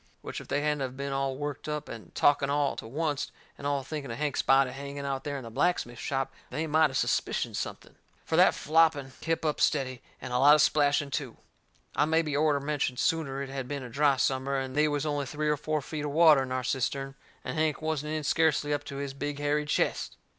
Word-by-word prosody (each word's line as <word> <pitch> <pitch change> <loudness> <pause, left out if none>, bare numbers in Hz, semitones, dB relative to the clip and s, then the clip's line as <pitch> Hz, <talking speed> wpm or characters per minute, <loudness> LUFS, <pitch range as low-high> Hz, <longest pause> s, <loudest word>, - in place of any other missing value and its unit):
Which - - -5
if - - -13
they 145 - 0
hadn't 150 -1 0
of 130 -1 -4
been 140 0 -3
all 135 -1 -1
worked 145 +1 -5
up 150 0 -3
and 115 - -10
talking 145 -1 +3
all 145 0 +1
to - - -6
oncet 145 +3 -2 0.3
and 140 - -5
all 140 -1 0
thinking 145 -1 -5
of 115 - -5
Hank's 150 -2 0
body 135 -1 +4
hanging 140 +1 -6
out 135 -1 -2
there 145 -1 -3
in 135 - -7
the 115 - -8
blacksmith 120 -4 0
shop 135 -1 -2 0.2
they 160 - -2
might 155 0 +4
of 130 - -2
suspicioned - - 0
something. - - -5 0.3
For - - -1
that - - +6
flopping 155 -3 +2
kep' 165 0 -1
up 150 - 0
steady, 130 -4 +1 0.2
and 125 - -6
a 125 - +2
lot 145 +3 +8
of 155 - +4
splashing 145 -1 +2
too. 135 -5 -3 0.6
I - - +3
mebby 160 -1 +1
orter 150 -1 +3
mentioned 140 -3 -1
sooner 140 -4 0
it 135 - -7
had 135 -2 -4
been 140 -1 -4
a 125 - -7
dry 140 +3 +3
summer 135 +1 0
and 130 -1 -4
they 150 +1 +4
was 145 0 -1
only 145 -2 -1
three 150 +3 -1
or 150 - +3
four 150 0 -2
feet 150 +1 -5
of 150 - -2
water 155 -1 +6
in 130 -1 -4
our 130 0 -1
cistern, 135 +2 -1 0.3
and - - -3
Hank 155 -1 +1
wasn't 155 -1 -2
in 155 -1 -2
scarcely 150 -1 +2
up 145 0 -1
to 140 - -7
his 140 -1 -4
big 145 +1 -4
hairy 145 +1 0
chest. - - 0
145 Hz, 235 wpm, -29 LUFS, 135-150 Hz, 0.6 s, lot